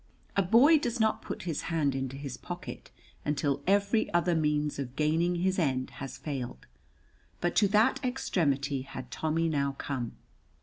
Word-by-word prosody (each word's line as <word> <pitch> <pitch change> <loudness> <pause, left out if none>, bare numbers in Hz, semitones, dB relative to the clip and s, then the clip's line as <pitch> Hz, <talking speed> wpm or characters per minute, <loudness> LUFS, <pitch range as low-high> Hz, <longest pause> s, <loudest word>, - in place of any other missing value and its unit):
A 195 - +4
boy 245 - +6
does 240 -3 -2
not 220 -1 +2
put - - -6
his 165 -4 -2
hand 155 -5 +1
into 135 0 -3
his 140 -2 -5
pocket 175 0 -7 0.3
until 145 -1 0
every 200 +3 +2
other 175 0 +3
means 150 -2 0
of 130 -2 -5
gaining 165 +4 +2
his 185 +2 +1
end 130 -5 0
has 135 - -5
failed, 130 - -5 0.7
but 175 - 0
to 205 - +6
that 220 +7 +3
extremity 145 - 0
had 130 -1 -8
Tommy 160 +1 0
now 140 -3 0
come. 130 -4 -4
155 Hz, 160 wpm, -30 LUFS, 140-190 Hz, 0.7 s, boy